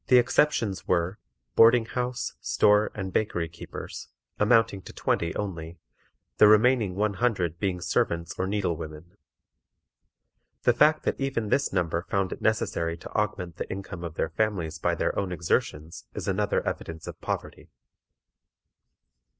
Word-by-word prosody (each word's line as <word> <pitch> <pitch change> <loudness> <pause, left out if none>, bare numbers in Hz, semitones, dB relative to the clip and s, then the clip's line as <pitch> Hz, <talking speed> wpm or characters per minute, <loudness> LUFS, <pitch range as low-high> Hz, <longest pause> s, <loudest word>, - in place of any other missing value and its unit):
The 125 - +6
exceptions 120 -5 +2
were, 90 +3 0 0.4
boarding 115 0 +6
house, 125 +1 -3
store, 105 +1 +3
and 95 -3 -5
bakery 90 -6 0
keepers, 80 +1 -8 0.3
amounting 110 -2 +3
to - - -11
twenty 85 -1 -1
only, 85 -4 -5 0.6
the 105 - +8
remaining 110 -2 +4
one 105 +1 +1
hundred 95 -8 0
being 95 -3 -1
servants 85 0 0
or 95 - 0
needle 95 -4 0
women. 80 +3 -9 1.5
The 120 - +5
fact 150 +5 +4
that - - -1
even 130 -6 -1
this 140 +4 +1
number 85 -3 0
found 95 -2 0
it - - -6
necessary 85 -6 0
to - - -10
augment 90 -5 -2
the - - -5
income 95 -2 -6
of 85 -2 -6
their 80 - -1
families 85 -4 -1
by - - +1
their - - -1
own 95 -2 -2
exertions 80 -2 -2
is - - -5
another - - 0
evidence 80 -1 -4
of - - -9
poverty. - - -5
95 Hz, 145 wpm, -27 LUFS, 85-110 Hz, 1.5 s, the